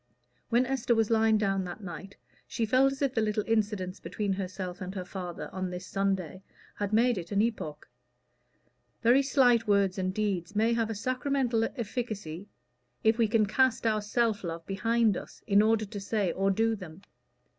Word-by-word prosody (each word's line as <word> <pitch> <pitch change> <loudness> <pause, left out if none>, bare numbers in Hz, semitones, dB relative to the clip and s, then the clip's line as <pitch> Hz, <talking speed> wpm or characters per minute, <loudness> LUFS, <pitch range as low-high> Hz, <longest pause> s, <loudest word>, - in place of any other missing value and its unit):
When 240 +2 +3
Esther 255 -2 +1
was 225 0 +1
lying 220 -1 +4
down 195 -2 0
that 180 +4 -8
night, 190 +2 -8 0.3
she 230 - -1
felt 260 +4 +4
as 275 +1 -4
if 270 -2 +1
the 225 - +1
little 210 0 0
incidents 210 -4 -1
between 205 -2 -2
herself 185 -1 -5
and 185 +1 -5
her 185 -2 -4
father 180 -2 -6
on 185 -1 -3
this 180 0 -6
Sunday 190 -3 -2 0.3
had 205 -1 -3
made 230 0 +3
it 170 -1 -9
an 200 - +1
epoch. 215 -10 -3 1.2
Very 245 +4 +6
slight 245 -4 +3
words 200 -2 +2
and 185 0 0
deeds 200 -2 -2
may 225 +3 +3
have 230 -1 0
a 225 - -3
sacramental 255 0 0
efficacy, 205 -6 -5 0.5
if 220 +1 +3
we 230 - +4
can 215 0 +3
cast 255 +3 +2
our 215 -1 +2
self 215 0 0
love 165 -1 -5
behind 225 +1 +1
us, - - -9
in 200 -1 +5
order 220 0 +2
to 205 0 -7
say 195 -2 0
or 195 +3 0
do 225 +3 +2
them. 185 -2 -11
210 Hz, 180 wpm, -29 LUFS, 190-230 Hz, 1.2 s, Very